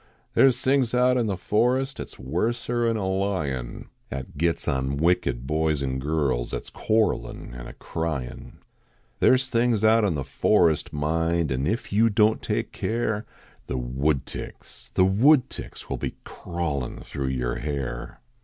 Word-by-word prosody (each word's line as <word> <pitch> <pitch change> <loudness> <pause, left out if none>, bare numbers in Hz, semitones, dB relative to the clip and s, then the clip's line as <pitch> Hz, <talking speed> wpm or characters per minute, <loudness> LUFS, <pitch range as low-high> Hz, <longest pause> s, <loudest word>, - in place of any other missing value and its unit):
There 135 - +6
s 125 -2 +2
things 130 -3 +2
out 125 +1 +4
in 120 -3 +1
the 100 -3 -1
forest 125 +8 +1
At - - -4
s - - -13
worser 115 - -1
n 115 -1 +1
a 100 - -2
lion, 90 -11 -2 0.2
At 65 0 -6
gets 85 +3 0
on 65 +1 0
wicked 75 -7 +1
boys 75 0 0
n 65 -1 -1
girls 70 -4 0
At - - -4
s - - -11
cjiiarrelin 110 - 0
an - - -8
a - - -9
cryin. 80 -7 -4 0.7
There - - +6
s 130 +1 -1
things 115 -3 +1
out 110 +1 +5
in 95 -6 +1
the 70 - -2
forest, 85 0 +2
mind. 80 +1 0
An 65 +2 0
if 110 0 -2
you 115 +3 +5
don 110 +1 +3
t - - -2
take - - -2
care, 110 -2 -2 0.4
The 65 - -2
wooclticks 65 0 -3
the 95 - +5
woodticks 125 +8 +2
Will - - -3
be - - -4
crawlin 80 -7 -4
thro 70 -2 -4
yer 60 -2 -1
hair. 70 -5 -4
85 Hz, 165 wpm, -25 LUFS, 70-110 Hz, 0.7 s, There